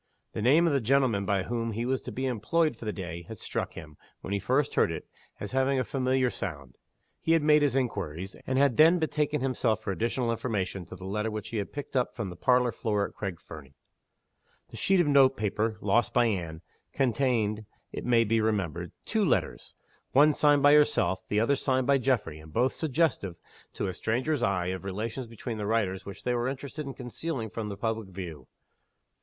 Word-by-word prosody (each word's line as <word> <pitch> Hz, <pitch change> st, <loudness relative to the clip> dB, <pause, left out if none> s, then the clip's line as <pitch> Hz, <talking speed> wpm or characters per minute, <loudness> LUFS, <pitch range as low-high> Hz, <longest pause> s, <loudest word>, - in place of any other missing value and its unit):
The 110 Hz, -, -3 dB
name 145 Hz, +9 st, +5 dB
of 165 Hz, -, +2 dB
the 140 Hz, -, +2 dB
gentleman 115 Hz, -5 st, +2 dB
by 100 Hz, -1 st, +1 dB
whom 115 Hz, +1 st, -2 dB
he 115 Hz, +3 st, -2 dB
was 130 Hz, +1 st, 0 dB
to -, -, -7 dB
be 130 Hz, -, -3 dB
employed 130 Hz, +5 st, +1 dB
for 115 Hz, -, -10 dB
the 105 Hz, -, -1 dB
day 85 Hz, -4 st, -6 dB
had 110 Hz, -, -8 dB
struck -, -, -4 dB
him, 75 Hz, -1 st, -10 dB, 0.2 s
when 100 Hz, -, -4 dB
he 100 Hz, -, 0 dB
first 130 Hz, +8 st, +1 dB
heard -, -, +3 dB
it, -, -, -6 dB, 0.3 s
as 105 Hz, -, -5 dB
having 135 Hz, +1 st, +2 dB
a -, -, +1 dB
familiar 130 Hz, 0 st, +1 dB
sound. 70 Hz, -10 st, -6 dB, 0.4 s
He 165 Hz, -, +2 dB
had 165 Hz, -2 st, +3 dB
made 150 Hz, 0 st, +5 dB
his 140 Hz, -3 st, +2 dB
inquiries; 95 Hz, -, -2 dB
and 130 Hz, -, 0 dB
had 135 Hz, -4 st, +3 dB
then 165 Hz, +3 st, +7 dB
betaken 150 Hz, -3 st, 0 dB
himself 125 Hz, -4 st, +1 dB
for 100 Hz, -, -2 dB
additional 115 Hz, +4 st, -1 dB
information, 100 Hz, -6 st, -2 dB
to 90 Hz, -, -10 dB
the 95 Hz, 0 st, -10 dB
letter 105 Hz, +3 st, -1 dB
which 110 Hz, -1 st, -5 dB
he 115 Hz, -, -3 dB
had 100 Hz, -, -3 dB
picked 145 Hz, -1 st, -7 dB
up 125 Hz, -1 st, 0 dB
from 100 Hz, -6 st, -4 dB
the -, -, -8 dB
parlor 125 Hz, +6 st, +3 dB
floor 105 Hz, -3 st, -1 dB
at -, -, -16 dB
Craig 95 Hz, -5 st, -5 dB
Fernie. 70 Hz, -4 st, -12 dB, 0.9 s
The -, -, -11 dB
sheet 195 Hz, -1 st, +2 dB
of 175 Hz, -, +4 dB
note 135 Hz, -2 st, +5 dB
paper, 105 Hz, +1 st, -1 dB
lost 120 Hz, +4 st, +1 dB
by 120 Hz, -1 st, +5 dB
Anne, 85 Hz, -7 st, -2 dB, 0.3 s
contained, 115 Hz, -5 st, 0 dB, 0.2 s
it -, -, -5 dB
may 120 Hz, -2 st, +4 dB
be 115 Hz, 0 st, +1 dB
remembered, 90 Hz, -6 st, -1 dB
two 220 Hz, -1 st, +1 dB
letters 160 Hz, -, -1 dB, 0.4 s
one 150 Hz, +3 st, +6 dB
signed 145 Hz, -1 st, +3 dB
by 145 Hz, 0 st, +7 dB
herself; 150 Hz, -10 st, +3 dB
the 105 Hz, -, +1 dB
other 115 Hz, +6 st, +3 dB
signed 130 Hz, -1 st, 0 dB
by 140 Hz, 0 st, +4 dB
Geoffrey 110 Hz, -, 0 dB
and 75 Hz, 0 st, -13 dB
both 125 Hz, +10 st, +1 dB
suggestive, 150 Hz, -, 0 dB, 0.4 s
to -, -, -3 dB
a 95 Hz, -, -2 dB
stranger's 130 Hz, -, -1 dB
eye, 90 Hz, -4 st, +1 dB
of 95 Hz, 0 st, -4 dB
relations 110 Hz, +6 st, -4 dB
between 115 Hz, 0 st, -6 dB
the 105 Hz, -, -2 dB
writers 100 Hz, -4 st, 0 dB
which 100 Hz, -, -9 dB
they 125 Hz, -, 0 dB
were 120 Hz, 0 st, 0 dB
interested 140 Hz, +2 st, -5 dB
in 135 Hz, -, -6 dB
concealing 125 Hz, -2 st, -5 dB
from 110 Hz, -2 st, -4 dB
the 100 Hz, -, -6 dB
public 110 Hz, -1 st, -2 dB
view. 85 Hz, -8 st, -8 dB
115 Hz, 210 wpm, -28 LUFS, 100-135 Hz, 0.9 s, then